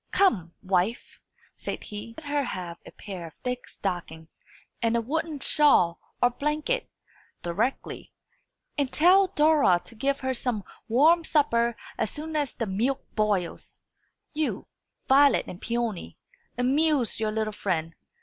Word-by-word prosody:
"Come, 185 - +2
wife," 190 +4 -1 0.3
said - - -5
he, 210 +2 -8
"let 320 - -9
her 290 0 0
have 175 -8 -5
a - - -10
pair 185 -5 -8
of 160 - -14
thick 250 0 -3
stockings 165 -4 -5 0.4
and 230 0 +2
a - - +2
woollen 305 +5 -2
shawl 270 - +4 0.2
or 245 - +5
blanket 300 - -1 0.5
directly; 210 +10 -2 0.7
and 275 -3 0
tell 375 +5 +5
Dora 300 - +4
to - - -6
give 275 +5 -1
her 260 0 0
some 235 -4 -1 0.2
warm 315 +9 +5
supper 235 -7 +2 0.2
as 220 - +1
soon 310 +1 -6
as 290 -3 -1
the 230 - -2
milk 225 +7 -1
boils. 205 -5 -1 0.6
You, 310 0 -2 0.4
Violet 280 +1 +5
and 180 - -9
Peony, 235 -5 -3 0.4
amuse 270 0 +2
your 215 -1 0
little 215 0 -1
friend. 165 -5 -2
240 Hz, 140 wpm, -27 LUFS, 200-295 Hz, 0.7 s, or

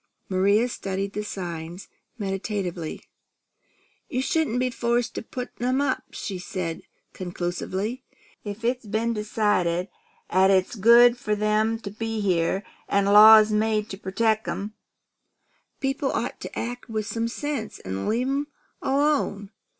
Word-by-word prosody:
Maria 200 +5 +3
studied 195 -4 -4
the 210 - -3
signs 175 -2 -6 0.3
meditatively. 195 -5 -3 1.1
"You 255 +1 -1
shouldn't 310 -6 0
be 255 0 0
forced 240 0 0
to - - -4
put 250 +2 -6
'em 255 +2 +1
up," 280 -2 0
she 190 -3 -5
said 180 -2 -4 0.3
conclusively. 185 +6 -3 0.4
"If 210 +2 -6
it's 245 -1 -1
been 225 +3 0
decided 205 -5 0 0.4
'at 190 +1 +4
it's 190 -1 +3
good 235 +3 +6
for 210 -3 -1
'em 215 +2 +1
to 200 - -6
be 225 +1 -3
here, 190 -1 +1 0.3
an' 200 0 +2
laws 215 +1 +9
made 215 0 +1
to - - -4
protect 220 +3 0
'em, 205 +2 -4 1.1
people 270 +1 -1
ought - - -2
to - - -8
act 245 +1 -5
with 215 -1 -2
some 230 +2 -2
sense, 270 -2 -4
an' 95 +1 -4
leave 235 +4 +1
them 280 +2 -1 0.3
alone. 270 -8 +1
215 Hz, 135 wpm, -25 LUFS, 195-235 Hz, 1.1 s, laws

